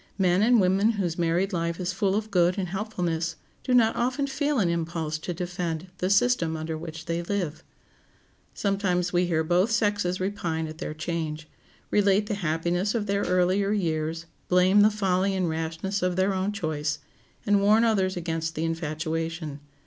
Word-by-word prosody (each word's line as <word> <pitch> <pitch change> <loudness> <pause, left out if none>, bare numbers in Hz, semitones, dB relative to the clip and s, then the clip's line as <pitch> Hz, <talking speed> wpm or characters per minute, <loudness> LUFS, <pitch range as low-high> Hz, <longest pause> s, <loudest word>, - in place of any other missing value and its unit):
Men 185 -1 +3
and 235 +2 +5
women 195 +4 +3
whose 180 -5 -2
married 175 +4 +1
life 170 -1 -1
is 180 0 -2
full 195 0 +1
of 215 +1 -2
good 180 -1 +3
and 185 -3 -2
helpfulness 175 -5 -2 0.3
do 255 - -3
not 235 -3 +4
often 255 +4 0
feel 285 +1 -1
an 200 -6 +2
impulse 165 -2 -2
to 180 - -5
defend 175 -1 -4
the 185 - 0
system 200 -7 +2
under 160 +1 -4
which 160 0 -7
they 170 0 -1
live. 175 -4 -3 0.9
Sometimes 185 -3 0
we 175 0 +2
hear 160 -2 +1
both 175 +6 +2
sexes 205 -4 +1
repine 175 -4 -2
at 155 0 -9
their 155 - -4
change, 155 -1 -4 0.4
relate 205 0 +3
the 210 - -3
happiness 175 +3 -1
of 220 -3 0
their 200 0 0
earlier 185 +2 +2
years, 165 -4 -1 0.2
blame 185 +3 +5
the 210 - +6
folly 195 -2 0
and 185 -2 0
rashness 165 +5 -3
of 180 0 0
their 190 +2 +2
own 190 +2 -1
choice, 155 -6 -2 0.5
and 205 -1 +3
warn 215 +3 +5
others 190 -5 +1
against 165 -1 -3
the 160 - -1
infatuation. 160 -1 -3
180 Hz, 170 wpm, -26 LUFS, 165-200 Hz, 0.9 s, the